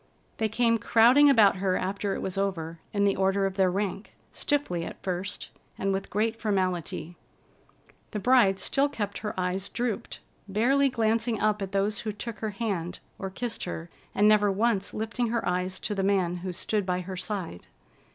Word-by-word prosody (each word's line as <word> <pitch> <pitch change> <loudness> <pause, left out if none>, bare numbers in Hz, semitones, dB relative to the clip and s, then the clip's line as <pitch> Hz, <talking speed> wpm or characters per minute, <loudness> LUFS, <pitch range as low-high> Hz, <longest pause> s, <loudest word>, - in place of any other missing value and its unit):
They 220 -1 0
came 230 +1 +2
crowding 245 +7 +6
about 215 -7 +6
her 185 -1 +1
after 195 +1 -2
it - - -4
was 190 - -3
over, 170 -4 -2
in 200 -1 +1
the 200 -1 +3
order 195 +1 +2
of 195 - -1
their 190 -1 +3
rank, 195 +2 -3 0.2
stiffly 275 - -1
at - - -7
first 185 +1 -3 0.3
and 195 0 0
with 195 0 -3
great 220 +2 -1
formality. 180 -5 -1 0.9
The - - -4
bride 210 -3 +4
still 275 +8 +2
kept 205 -7 -4
her 210 -3 -4
eyes 185 +2 -1
drooped, 240 -4 -3 0.3
barely 260 +8 +3
glancing 225 -1 +1
up 210 -1 +1
at 195 -1 -3
those 200 +2 0
who 215 - -3
took 215 +2 -7
her 220 - -2
hand 195 -5 -3 0.2
or 195 - -3
kissed 235 +4 -3
her 170 -1 -6 0.2
and 205 +1 +5
never 210 -1 +5
once 200 -1 +1
lifting 225 +3 -1
her 235 +1 -1
eyes 180 +1 -1
to 210 - -1
the 195 - -1
man 190 -3 +1
who 180 +1 -4
stood 205 +4 -1
by 180 -1 -1
her 185 +1 -6
side. 180 - -5
200 Hz, 180 wpm, -27 LUFS, 185-225 Hz, 0.9 s, crowding